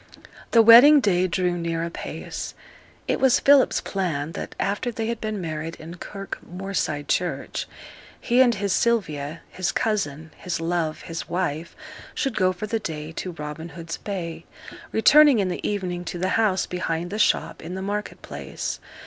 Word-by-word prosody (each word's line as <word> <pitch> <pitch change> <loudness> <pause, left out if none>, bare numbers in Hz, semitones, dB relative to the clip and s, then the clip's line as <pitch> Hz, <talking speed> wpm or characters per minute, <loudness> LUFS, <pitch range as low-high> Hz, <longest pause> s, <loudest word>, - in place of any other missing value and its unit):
The 230 -1 +6
wedding 245 +7 +9
day 185 -6 +2
drew 180 0 0
near 165 -1 -2
apace. 170 - -6 0.5
It - - 0
was 265 -2 +4
Philip's 280 -1 +5
plan 165 -6 -2
that - - -6
after 205 +5 -1
they 225 -1 -3
had 230 0 -3
been 215 -1 -3
married 160 -1 -4
in 165 +2 -10
Kirk 195 +1 -7
Moorside 180 -5 -3
church, 170 -7 -1 0.5
he 245 +2 +3
and 245 -3 +5
his 200 -1 -1
Sylvia, 165 -11 0
his 185 - -1
cousin, 160 -8 -1
his 175 -2 -3
love, 165 -2 -1
his 165 0 -6
wife, 170 -2 -2 0.4
should 270 -4 -1
go 185 -2 +3
for 185 +3 -5
the 225 +1 -1
day 155 -5 -5
to 180 +2 -5
Robin 150 +2 -7
Hood's 170 +1 -6
Bay, 170 -5 -5 0.5
returning 290 +4 +6
in 195 -3 +1
the 175 - -4
evening 180 -4 -3
to 175 - -4
the 185 +2 -1
house 210 -4 +2
behind 175 -1 -3
the 210 - -3
shop - - +1
in 175 +3 -6
the 190 - -4
market 205 +1 -4
place. - - -5
180 Hz, 165 wpm, -24 LUFS, 165-215 Hz, 0.5 s, wedding